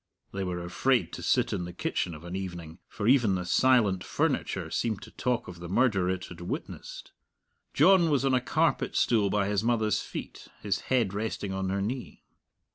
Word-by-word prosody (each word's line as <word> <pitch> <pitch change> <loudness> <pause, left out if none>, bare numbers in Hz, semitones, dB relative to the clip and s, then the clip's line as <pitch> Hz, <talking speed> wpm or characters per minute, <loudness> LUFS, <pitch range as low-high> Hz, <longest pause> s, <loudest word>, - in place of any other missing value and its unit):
(They 95 0 -2
were 90 -1 -3
afraid 115 +2 +1
to - - -6
sit - - +1
in 90 - -2
the 90 - -8
kitchen 85 0 -2
of 75 - -12
an 85 +1 -6
evening, 85 -3 -6
for 105 - -4
even 120 -6 +4
the 90 -1 -3
silent 105 -3 +3
furniture - - -1
seemed 110 -4 -1
to - - -12
talk 125 -2 -1
of 90 -1 -9
the 85 -1 -7
murder 95 -4 +2
it 95 0 -2
had 85 -1 -11
witnessed.) 85 - -6 0.6
John 175 +2 +6
was 140 -2 +2
on 135 - +2
a 125 - +3
carpet 150 +3 0
stool 110 -4 +3
by 100 0 +1
his 105 0 0
mother's 115 -2 +1
feet, - - -8 0.2
his - - 0
head 120 -7 +2
resting 105 -2 -3
on 95 0 -2
her 95 +1 -1
knee. 125 +4 -5
100 Hz, 195 wpm, -28 LUFS, 90-125 Hz, 0.6 s, John